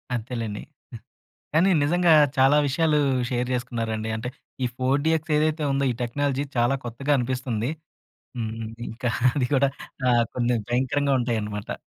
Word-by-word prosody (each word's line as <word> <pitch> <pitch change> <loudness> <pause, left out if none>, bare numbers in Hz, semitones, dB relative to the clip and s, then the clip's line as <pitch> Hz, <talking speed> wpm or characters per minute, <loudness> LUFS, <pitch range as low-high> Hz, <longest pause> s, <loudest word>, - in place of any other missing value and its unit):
అంతేలెండి. 115 -3 -4 0.9
కానీ, 175 +5 +5
నిజంగా 175 +3 +3 0.3
చాలా 135 +3 +5
విషయాలు 150 +2 +2 0.3
షేర్ 125 0 -1
చేసుకున్నారండి. 115 -3 -3
అంటే, 120 +3 -4 0.4
ఈ - - +3
4 130 +2 +1
డీఎక్స్ 160 0 +1
ఏదైతే 155 0 +1
ఉందో, 135 0 +1
ఈ - - -8
టెక్నాలజీ 140 +3 -1
చాలా 120 +3 +3
కొత్తగా 135 +5 -2
అనిపిస్తుంది. 125 -1 -2 0.7
హ్మ్. 110 -1 -3 0.4
ఇంకా 120 +1 -3 0.2
అది 135 -4 +1
గుడా 135 +1 +3 0.4
ఆహ్, 120 -1 +4
కొన్ని 120 -1 +1
భయంకరంగా 135 +3 +1
ఉంటాయనమాట. 105 -4 -3
130 Hz, 130 wpm, -25 LUFS, 120-145 Hz, 0.9 s, కానీ